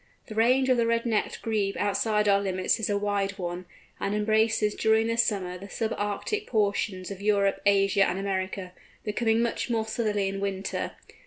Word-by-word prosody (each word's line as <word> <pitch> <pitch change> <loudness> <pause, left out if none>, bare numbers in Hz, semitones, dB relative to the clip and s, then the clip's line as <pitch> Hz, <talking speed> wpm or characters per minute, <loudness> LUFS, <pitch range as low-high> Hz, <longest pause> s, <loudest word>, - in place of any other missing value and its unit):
The - - -6
range 250 +4 +3
of 255 - +4
the 230 -1 +2
Red 230 0 +1
necked 220 -3 -1
Grebe 210 -3 -1
outside 210 +1 +1
our 200 0 +4
limits 185 0 0
is 220 - -1
a 205 - +1
wide 200 -1 -1
one, 175 -1 -4 0.3
and 200 - -1
embraces 215 0 +2
during 220 +1 +2
summer 195 -6 0
the 200 +2 -10
sub 225 +2 -2
Arctic 205 - -2
portions 200 -3 0
of 195 0 -7
Europe, 200 -1 +2
Asia, 195 0 +4
and 180 - -2
America, 190 -1 -3 0.3
becoming 225 +1 +1
much 235 +1 -2
more 225 -2 0
southerly 215 -3 -1
in 195 0 -3
winter. 195 -1 -3
205 Hz, 175 wpm, -27 LUFS, 195-225 Hz, 0.3 s, of